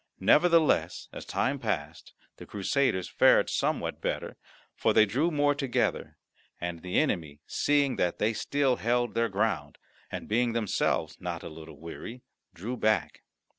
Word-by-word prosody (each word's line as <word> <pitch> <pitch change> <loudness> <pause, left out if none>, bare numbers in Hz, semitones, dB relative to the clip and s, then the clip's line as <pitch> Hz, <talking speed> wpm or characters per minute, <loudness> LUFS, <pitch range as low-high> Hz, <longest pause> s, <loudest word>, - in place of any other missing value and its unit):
Nevertheless 160 - +3
as - - -8
time 135 +1 -1
passed 80 - -4 0.2
the - - -11
Crusaders 100 -1 0
fared - - +4
somewhat - - -1
better, - - -3 0.4
for - - +2
they 110 - +6
drew 135 +11 +1
more 145 -2 +2
together, 135 -4 -1 0.4
and 85 -1 -4
the 90 0 -2
enemy, 80 - 0
seeing 145 -2 +1
that 90 - 0
they 110 +2 +1
still 135 +3 +1
held 120 +1 0
their 115 0 +1
ground, 105 +3 -1 0.3
and - - -5
being 120 +2 +1
themselves 100 -7 0
not 85 -2 -5
a - - -6
little 80 -2 -11
weary, 115 +9 -8 0.3
drew 115 +8 -5
back. 110 -1 0
110 Hz, 145 wpm, -28 LUFS, 90-135 Hz, 0.4 s, they